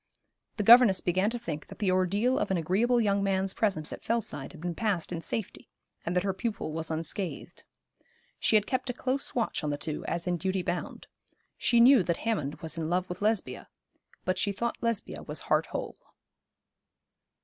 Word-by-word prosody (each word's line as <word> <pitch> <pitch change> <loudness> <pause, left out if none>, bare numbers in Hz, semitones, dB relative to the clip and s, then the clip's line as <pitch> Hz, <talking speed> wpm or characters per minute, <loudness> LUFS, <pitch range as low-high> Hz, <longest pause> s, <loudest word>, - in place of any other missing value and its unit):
The 210 - 0
governess 230 -3 +8
began 185 +3 +1
to 240 - -3
think 160 -10 -6
that - - -11
the 200 -4 +1
ordeal 200 +9 +2
of - - -1
an 190 - +1
agreeable 210 +9 +2
young 200 -3 +2
man's 195 -1 0
presence 175 -8 0
at - - -9
Fellside 220 -12 -2
had - - -12
been 175 +1 -3
passed 195 -4 -1
in 170 -2 -3
safety, 215 +3 -4 0.3
and 170 - -2
that 180 - +2
her 195 -1 0
pupil 205 -5 -3
was 160 0 -2
unscathed. 165 +3 -4 0.8
She - - +2
had 210 -1 +4
kept 255 +2 -2
a - - -1
close 260 +3 -2
watch 230 -7 -1
on 150 - -1
the 145 - -1
two, 150 0 -4
as 170 0 -2
in 180 -1 0
duty 190 +2 -1
bound. 175 0 -4 0.5
She 235 - +2
knew 250 0 +8
that 170 -2 -1
Hammond 160 -10 -2
was 160 0 -5
in 160 -1 -2
love 180 +1 0
with 180 +2 -6
Lesbia; 215 0 -1 0.6
but 185 - 0
she 205 - +1
thought 235 +4 -3
Lesbia 230 -3 -2
was - - -5
heart - - +1
whole. - - -5
190 Hz, 195 wpm, -29 LUFS, 170-225 Hz, 0.8 s, governess